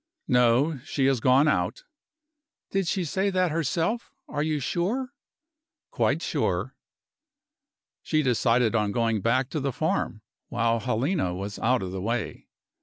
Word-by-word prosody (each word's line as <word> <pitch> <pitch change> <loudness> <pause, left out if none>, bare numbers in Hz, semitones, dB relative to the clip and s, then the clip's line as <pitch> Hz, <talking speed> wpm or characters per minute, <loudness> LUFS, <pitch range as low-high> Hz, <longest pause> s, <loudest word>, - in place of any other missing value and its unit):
"No 125 +5 +3
she 140 0 -1
has 135 -2 +3
gone 130 +5 +4
out." - - 0 0.9
"Did 195 -2 0
she 185 0 0
say 190 +6 0
that 185 -3 +1
herself? 165 - -1 0.2
Are 145 - -3
you 155 -1 0
sure?" 215 - -2 0.8
"Quite - - +1
sure." - - -1 1.3
She 155 -1 +1
decided 120 -2 +2
on 105 -3 +1
going 115 -3 +1
back 130 +4 +1
to 155 - -1
the 140 0 -1
farm, - - -1 0.3
while 115 +1 +1
Helena 125 - 0
was 100 +2 -5
out 125 -1 +2
of 90 - -4
the 95 0 -4
way. 115 +3 -3
130 Hz, 140 wpm, -26 LUFS, 115-165 Hz, 1.3 s, gone